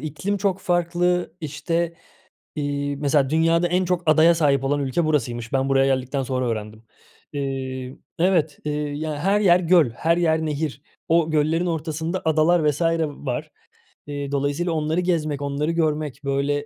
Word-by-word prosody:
iklim 155 +7 -3
çok 195 -1 -1
farklı. 175 -1 0
İşte, 165 +2 -2 0.6
iii, 145 -1 -2
mesela 140 -1 +1
dünyada 165 +2 +3
en 180 +2 +1
çok 180 0 0
adaya 160 +2 +6
sahip 140 -4 +2
olan 145 +1 +1
ülke 140 +5 0
burasıymış. 120 -6 -1
Ben 135 0 +1
buraya 135 0 +3
geldikten 130 +1 -3
sonra 130 -1 -2
öğrendim. 110 -1 -5 0.5
Eee 130 -2 -4 0.2
Evet. 165 -4 +2
Eee, 150 - -1
ya, 150 +1 -3
her 195 +6 +2
yer 180 -3 +5
göl, 170 -6 +4
her 165 +8 0
yer 160 -2 +1
nehir. 150 -2 -3 0.3
O 165 -1 +3
göllerin 155 +3 +1
ortasında 165 +2 -3
adalar 160 0 +3
vs. 150 - -6 0.3
var. 140 -4 -5 0.6
Eee, 145 -1 -5
dolayısıyla 145 +5 -1
onları 155 +1 0
gezmek, 155 -5 -1
onları 145 +2 -1
görmek, 155 -5 -1
böyle, 140 +1 -1
155 Hz, 150 wpm, -23 LUFS, 140-170 Hz, 0.6 s, adaya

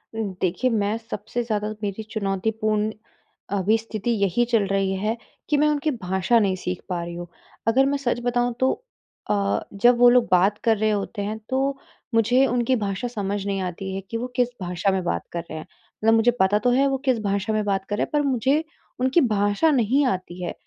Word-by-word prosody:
उ, - - -6 0.2
देखिए, 185 +8 +1
मैं 210 0 0
सबसे 230 +1 -5
ज़्यादा 215 -2 -2
मेरी 205 +1 -3
चुनौतीपूर्ण 215 +1 0 0.7
अभी 205 +4 +3
स्थिति 225 0 -5
यही 200 +5 +2
चल 230 -4 +2
रही 195 -1 0
है 215 +4 -1 0.3
कि 295 - +3
मैं 300 +1 +4
उनकी 300 +1 +1
भाषा 190 +5 +2
नहीं 195 -3 +1
सीख 180 -1 -4
पा 175 -2 -1
रही 170 - -6
हूँ। 175 0 -6 0.4
अगर 260 +4 +4
मैं 280 +1 +1
सच 245 -3 -1
बताऊँ 245 0 +1
तो 260 0 +3 0.6
अ, 200 -1 +1
जब 240 +5 +4
वो 245 0 +7
लोग 245 -1 +4
बात 190 +3 +4
कर 225 -1 +3
रहे 215 +1 +1
होते 205 +1 -2
हैं, 210 +2 -3
तो 270 +1 0 0.4
मुझे 245 +4 +4
उनकी 245 +1 +1
भाषा 205 +1 -2
समझ 205 -4 -3
नहीं 195 -1 -1
आती 190 +1 -4
है 195 - -3
कि 230 - -2
वो 245 +2 -3
किस 245 -1 +3
भाषा 180 +2 0
में 190 -1 -1
बात 85 - -1
कर 170 - -3
रहे 160 - -6
हैं, 155 - -7 0.4
मतलब 225 +1 +5
मुझे 225 +2 +4
पता 195 +2 +3
तो 245 - +2
है 275 +3 +3
वो 270 - 0
किस 255 -4 +2
भाषा 200 +1 0
में 215 0 +1
बात 195 -1 0
कर 205 - 0
रहे - - +1
हैं, - - -4
पर 295 - +3
मुझे 270 +4 +2 0.4
उनकी 260 +7 +3
भाषा 205 +4 +2
नहीं 265 +2 +3
आती 185 -5 -3
है। - - -3
215 Hz, 210 wpm, -24 LUFS, 195-245 Hz, 0.7 s, वो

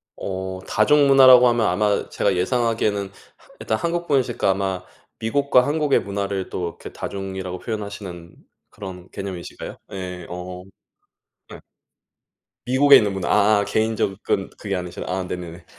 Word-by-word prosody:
어 95 -1 -5
다중문화라고 130 0 +6
하면 120 -2 +2
아마 105 -1 +1
제가 100 -2 0
예상하기에는 110 -1 0
하 100 - -22
일단 110 - -1
한국분이니시까 160 - 0
아마 95 -1 -2 0.4
미국과 125 +2 +2
한국의 150 -1 +2
문화를 100 -1 -3
또 90 -1 -3
이렇게 - - -11
다중이라고 95 -2 -5
표현하시는 100 -6 -7 0.3
그런 95 -3 -9
개념이신가요? 95 -3 -7 0.2
예, 90 -2 -6
어. 90 +1 -7 0.9
네. - - -11 1.1
미국에 135 +3 +7
있는 105 -2 +1
문화 95 -3 -3 0.3
아 - - +1
개인 110 +2 0
접근 95 -1 -1
그게 100 -2 -3
아니시라 90 -1 -5
아 95 +1 -1
네네네. 85 -1 -7
100 Hz, 330 characters per minute, -22 LUFS, 95-115 Hz, 1.1 s, 미국에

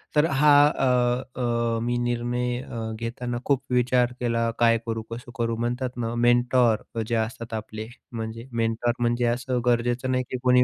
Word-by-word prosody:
तर 150 +1 +5
हा, 145 +2 +5 0.2
अ, 125 -1 0
अ, 120 -1 0
मी 120 +1 0
निर्णय 120 0 -1
अ, 115 -3 -5
घेताना 120 +1 -4
खूप 135 -2 +1
विचार 125 0 +2
केला 115 -1 0
काय 115 -1 +5
करू, 115 -1 -2
कसं 120 +1 -7
करू? 115 -1 0
म्हणतात 125 +2 -2
ना 115 -1 -2
मेंटॉर 120 -1 +2
जे 120 - 0
असतात 115 +1 -3
आपले, 110 0 -5 0.2
म्हणजे 115 +1 -6
मेंटॉर 115 +1 0
म्हणजे 120 0 +1
असं 125 +1 0
गरजेचं 120 +1 +1
नाही 130 0 +1
की 130 - -1
कोणी 125 0 +5
120 Hz, 165 wpm, -25 LUFS, 115-125 Hz, 0.2 s, तर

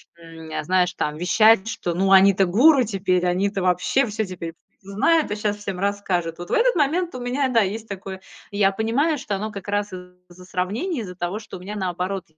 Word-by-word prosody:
м, 165 -1 -12
э, 155 0 -3
знаешь, 180 +2 +1
там 150 -3 -2
вещать, 215 +4 +4
что, 175 -6 -3
ну, 195 +2 +1
они-то 195 0 +6
гуру 255 - +5
теперь, 185 -4 0
они-то 195 +2 0
вообще 180 +9 +2
всё 220 -1 -3
теперь 170 -3 -7 0.3
знают, 215 +12 +1
а 210 - -2
щас 210 -1 -2
всем 200 -3 -5
расскажут. 185 -4 -2
Вот 175 - -8
в - - 0
этот - - +3
момент 335 +3 +1
у 255 - -6
меня, 255 +2 -1
да, 240 -2 +3
есть 215 +3 -3
такое. 190 -1 -7 0.3
Я 200 -1 +2
понимаю, 235 +10 0
что 250 -7 -4
оно 215 +2 -4
как 200 -2 -9
раз 205 0 -1
из-за 180 0 -13
сравнения, 215 - -2
из-за 180 -4 -8
того, 180 +4 -3
что 210 - -10
у - - -13
меня 195 +4 -7
наоборот. 185 0 -3
195 Hz, 205 wpm, -22 LUFS, 180-220 Hz, 0.3 s, они-то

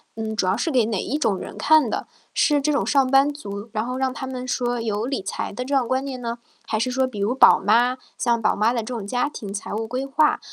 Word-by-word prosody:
嗯， 220 -1 -3
主 205 -3 0
要 185 +2 +2
是 315 +8 -1
给 245 -5 +3
哪 220 -3 -1
一 290 - -2
种 210 -10 +1
人 - - -8
看 305 -6 +4
的， - - -3 0.3
是 295 -2 +3
这 300 +2 +1
种 285 - 0
上 275 -2 +4
班 275 +2 +5
族， 205 -7 -7
然 215 +1 -1
后 250 +1 -3
让 265 -1 0
他 270 - -5
们 255 -1 -6
说 245 -1 -1
有 220 -1 -2
理 270 -5 -2
财 190 - -4
的 250 +5 -5
这 280 - -1
样 260 -3 +2
观 260 +2 0
念 260 -2 -5
呢？ 235 0 -3 0.3
还 215 - -1
是 255 - 0
说 260 +1 +1
比 230 -6 -6
如 215 +6 0
宝 - - +7
妈 245 +2 +3 0.2
像 235 -1 +1
宝 - - +2
妈 220 +4 +2
的 235 - -1
这 220 - -4
种 230 -5 -5
家 245 +7 0
庭 205 -8 -7
财 205 - -5
务 220 +2 -2
规 255 +3 -3
划， 295 +3 +2
245 Hz, 290 characters per minute, -23 LUFS, 220-265 Hz, 0.3 s, 宝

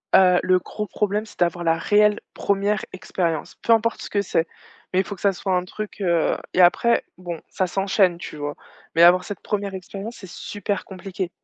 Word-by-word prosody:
heu, 180 -1 +6
le 185 0 +4
gros 210 +3 -6
problème, 210 +1 -1
c'est 215 - -16
d'avoir 175 0 +1
la 165 -1 +2
réelle 210 +4 +3
1re 200 +1 0
expérience, 170 -3 -2
peu 230 - +4
importe 230 0 +1
ce - - -7
que 200 - +1
c'est, 165 -3 0 0.4
mais 185 - +2
il 190 - +1
faut - - -5
que 185 - -17
ça 200 -1 +3
soit 190 0 -1
un 180 - 0
truc, 210 +2 -7
heu 170 -4 +2 0.2
et 185 - +4
après, 235 +7 +4 0.2
bon, 175 -2 -5
ça 185 - -1
s'enchaîne, 190 -1 +2
tu 155 - -8
vois? 145 0 -4 0.4
Mais 165 - +6
avoir 180 +1 +7
cette 205 - -6
1re 200 -2 -2
expérience, 195 +5 -7
c'est 190 -3 -11
super 205 +2 -4
compliqué. 185 -1 -5
190 Hz, 205 wpm, -23 LUFS, 175-205 Hz, 0.4 s, avoir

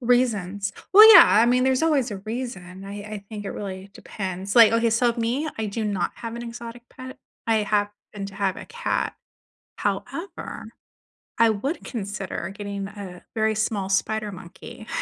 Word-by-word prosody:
Reasons. 210 -6 +1 0.2
Well, 430 +3 +11
yeah. - - +12
I 220 +3 +5
mean, 250 +1 +3
there's 260 +1 +2
always 290 -7 +2
a 200 - -5
reason. 195 -4 -6
I 200 - -7
I 210 -1 -7
think 210 -2 -6
it - - -3
really 195 -1 -7
depends. 190 -1 -5
Like, 230 -2 +8
okay, 230 0 +2
so 235 +2 +2
me, 240 +7 -1
I 220 - -2
do 210 +2 -3
not 200 -4 -1
have 230 -1 -6
an 235 - -6
exotic 235 0 -8
pet. 260 0 -10 0.3
I 225 -1 +3
happen 205 -1 -2
to 195 - -11
have 195 -1 -1
a - - -9
cat. 475 +1 -2 0.6
However, 360 +4 -4 0.7
I 230 -1 +6
would 265 - -3
consider 200 -5 -5
getting 200 -1 -5
a 195 -4 -10
very 220 0 +1
small 210 -2 -1
spider 210 +2 0
monkey. 180 +4 -11
215 Hz, 170 wpm, -24 LUFS, 200-235 Hz, 0.7 s, yeah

